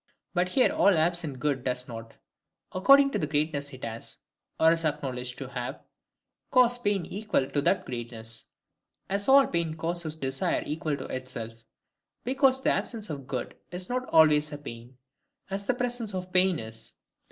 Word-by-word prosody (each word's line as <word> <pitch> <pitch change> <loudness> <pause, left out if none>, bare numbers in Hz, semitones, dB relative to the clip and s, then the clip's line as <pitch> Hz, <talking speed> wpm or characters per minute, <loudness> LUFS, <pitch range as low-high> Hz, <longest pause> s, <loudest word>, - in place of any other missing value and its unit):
But 180 0 +1
here 255 +6 +3
all 200 -4 +4
absent 160 -3 +1
good 140 -2 0
does 125 -1 -1
not, 115 -1 -9 0.6
according 275 +9 +6
to - - -1
the 150 - 0
greatness 145 -1 -1
it 130 -1 -11
has, 115 0 -7 0.4
or 160 0 +6
is 165 0 0
acknowledged 130 -5 -2
to 135 - -6
have, 125 -2 -5 0.7
cause 245 -1 +4
pain 205 -6 0
equal 205 -9 -1
to 145 - +1
that 190 - +2
greatness; 115 -2 -5 0.7
as 200 +4 0
all 275 0 +8
pain 170 -2 -1
causes 165 -1 -1
desire 135 -3 -1
equal 155 -1 -2
to 130 - -6
itself: 130 -3 -5 0.7
because 265 +1 +3
the - - +4
absence 220 -5 -2
of 140 -3 -6
good - - -4 0.2
is 180 +1 -5
not 255 +1 -2
always 150 -1 +5
a 145 - -5
pain, 120 -3 -10 0.5
as 200 +1 -3
the 255 - +2
presence 245 -4 -2
of 185 0 -5
pain 185 -1 +4
is. 110 -1 -8
155 Hz, 165 wpm, -28 LUFS, 130-200 Hz, 0.7 s, all